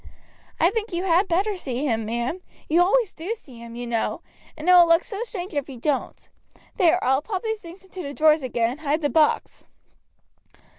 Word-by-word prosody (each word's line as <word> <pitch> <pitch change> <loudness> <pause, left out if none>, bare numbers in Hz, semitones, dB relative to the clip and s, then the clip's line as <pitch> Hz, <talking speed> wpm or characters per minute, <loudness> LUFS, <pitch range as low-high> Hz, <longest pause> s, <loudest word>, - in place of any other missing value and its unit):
"I - - +4
think 450 -1 -3
you 350 +1 -2
had 370 +2 +3
better 390 +5 +1
see 275 -7 -3
him, 225 -5 0
ma'am. 235 +9 -2 0.3
You 335 +3 +4
always 415 +3 +2
do 360 +8 -4
see 260 - -15
him, 235 0 -10
you 245 0 -5
know, 235 -1 -2 0.3
and 310 +3 -7
it 365 - +7
will 350 -1 +8
look 335 +1 +4
so 410 0 -6
strange 390 -6 -6
if 285 -1 -2
you 265 - -8
don't. 275 +3 -2 0.5
There, 360 -5 +4
I 260 - +3
will 265 - +2
pop 375 +3 -4
these 445 -1 -3
things 350 +2 -12
into 375 -1 -8
the 280 -4 -5
drawers 310 +1 +4
again 240 -3 0
and 270 - -8
hide 305 +1 -1
the 290 - 0
box." 315 -2 +1
325 Hz, 210 wpm, -24 LUFS, 265-375 Hz, 0.5 s, will